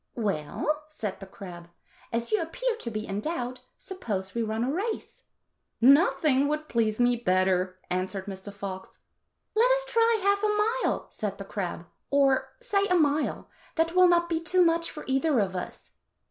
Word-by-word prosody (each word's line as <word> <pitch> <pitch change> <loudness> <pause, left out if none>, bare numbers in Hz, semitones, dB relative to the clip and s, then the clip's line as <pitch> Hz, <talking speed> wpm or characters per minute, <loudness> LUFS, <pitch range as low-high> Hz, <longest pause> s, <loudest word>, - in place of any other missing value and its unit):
"Well," 215 - -2
said 215 -11 -5
the 195 - -9
crab, 175 -3 -10 0.4
"as 230 0 -2
you 430 - +3
appear 470 +9 -2
to 250 - -4
be 215 -1 -4
in 195 -1 -3
doubt, 255 -2 -3 0.2
suppose 205 - -5
we 235 - -1
run 220 +1 -1
a 255 - 0
race." 430 +6 -4 0.3
" - - -51 0.2
Nothing 280 +1 +5
would 305 +1 -2
please 225 -3 0
me 245 0 +4
better," 185 -3 +1
answered 185 +1 -2
Mr. 195 0 -7
Fox. 195 -2 -7 0.3
" - - -52
Let 465 +3 +5
us - - +2
try 460 -2 +3
half 400 0 +3
a 425 +3 +2
mile," - - -1
said 200 -2 -4
the 195 - -7
crab, 180 -4 -4
" - - -50
or, 275 -2 +3
say, 405 -5 +1
a 365 - +3
mile; 300 -2 +1 0.3
that 325 0 +2
will 365 0 +7
not 345 -1 +3
be 330 -1 0
too 355 +2 +3
much 335 0 +2
for 300 - -8
either 270 +2 +1
of 195 -4 +1
us." 180 - -7
265 Hz, 185 wpm, -27 LUFS, -, 0.4 s, will